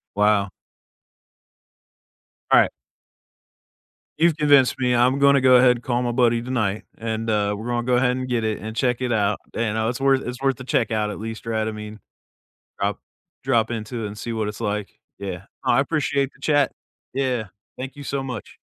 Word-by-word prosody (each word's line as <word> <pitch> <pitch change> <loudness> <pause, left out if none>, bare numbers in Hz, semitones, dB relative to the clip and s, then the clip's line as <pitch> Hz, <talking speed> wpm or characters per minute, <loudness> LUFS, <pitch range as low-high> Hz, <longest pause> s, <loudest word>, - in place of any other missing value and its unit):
Wow. 105 -1 +3 2.0
Right. - - +6 1.5
You've 165 -1 +3
convinced 145 -3 +5
me. 125 -1 +2
I'm 125 +3 +3
gonna 140 -1 +5
go 130 -1 +6
ahead 125 0 +7
and 120 - -14
call 125 -1 0
my 120 - 0
buddy 120 -1 +2
tonight, 110 -5 -1 0.2
and, 115 0 -3
uh, 105 -1 +1
we're 110 - -7
gonna 120 -1 -1
go 125 -1 +2
ahead 125 0 +3
and 130 0 -3
get 120 -2 0
it 110 -1 -1
and 110 +1 -6
check 125 0 0
it 125 -1 -1
out, 105 -2 +1 0.2
and, 110 -2 -1
uh, 110 0 +1
it's 125 - -4
worth 135 -1 +3
it's 125 +1 -6
worth 135 -2 +2
to 130 - -8
check 115 -3 0
out 105 -1 0
at 105 - -5
least, 110 +1 -6
right? 110 -1 0
I - - -1
mean 105 0 -8 0.8
drop - - -1 0.4
drop 120 -4 +2
into 115 0 -4
it - - -2
and 105 +1 -9
see 115 - -4
what 110 -2 -1
it's 105 +2 -7
like, 105 -2 -3 0.2
yeah. 95 -2 -6 0.2
No, - - +3
I 125 - +4
appreciate 140 -2 0
the 140 - -23
chat. 145 -2 +2 0.4
Yeah. 130 -4 0 0.3
Thank 135 +2 -6
you 145 - -8
so 140 -1 -2
much. 125 -5 -7
120 Hz, 195 wpm, -23 LUFS, 110-130 Hz, 2.0 s, ahead